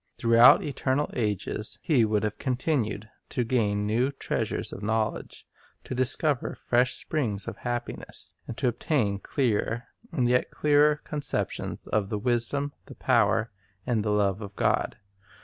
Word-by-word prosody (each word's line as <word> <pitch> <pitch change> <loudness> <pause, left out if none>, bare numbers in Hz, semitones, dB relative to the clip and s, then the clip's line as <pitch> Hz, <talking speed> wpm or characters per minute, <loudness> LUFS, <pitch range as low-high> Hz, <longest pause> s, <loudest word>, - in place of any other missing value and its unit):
Throughout 115 +1 +7
eternal 140 0 -1
ages 105 -2 -2
he 130 -8 +3
would 105 -1 0
have 105 -1 -2
continued 125 -5 -1 0.2
to 125 - 0
gain 105 -4 0
new 115 +5 +1
treasures 140 - -2
of - - -7
knowledge, 110 +1 -2 0.4
to - - -6
dis 130 +1 +4
cover 145 -6 -1
fresh 125 +1 +1
springs 110 -11 -2
of - - -5
happiness, 120 -1 -5
and 115 - -6
to 130 - +1
obtain 115 -5 0
clearer 120 -1 -1 0.3
and 125 -3 +1
yet 125 0 +2
clearer 150 0 +3
conceptions 150 -1 -3
of 105 -2 -1
the 105 - -1
wisdom, 125 +5 0
the - - -11
power, 115 +1 +2 0.3
and 115 -4 0
the 105 - -1
love 100 -1 +1
of 100 -1 -8
God. - - 0
120 Hz, 150 wpm, -27 LUFS, 105-130 Hz, 0.4 s, Throughout